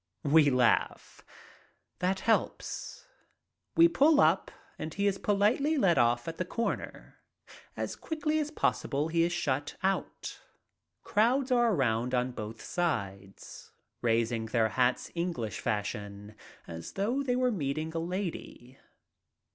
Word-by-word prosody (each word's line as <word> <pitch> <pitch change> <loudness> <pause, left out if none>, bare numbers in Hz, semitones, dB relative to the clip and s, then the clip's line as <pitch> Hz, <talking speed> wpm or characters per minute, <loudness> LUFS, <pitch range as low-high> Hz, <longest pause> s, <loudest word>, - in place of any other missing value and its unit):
We 145 0 +5
laugh. 125 -3 +1 0.8
That 185 +1 0
helps. 230 - -1 0.7
We 335 +1 +7
pull 310 -2 +4
up - - +3 0.3
and 155 - -4
he 200 - 0
is 195 -1 +1
politely 220 +10 +2
let 175 - +3
off 120 +2 +2
at 165 - -5
the - - -1
corner. 230 +6 -4 0.6
As - - -3
quickly 310 -1 -2
as 300 -1 -1
possible 150 - -1
he 165 +1 +2
is 170 +1 +2
shut 145 -5 -2
out. 195 0 -2 0.6
Crowds 250 +5 +2
are 240 -2 +4
around 125 - +1
on 125 +1 0
both 110 -1 -7
sides, 100 - -4 0.3
raising 115 -1 +1
their 110 -1 +1
hats 125 +2 0
English 170 -11 -3
fashion, 105 0 -4 0.3
as 85 -1 -8
though 230 +8 0
they 250 -3 0
were 250 0 +2
meeting 155 -3 -2
a 165 - -1
lady. 165 -8 -5
165 Hz, 130 wpm, -30 LUFS, -, 0.8 s, We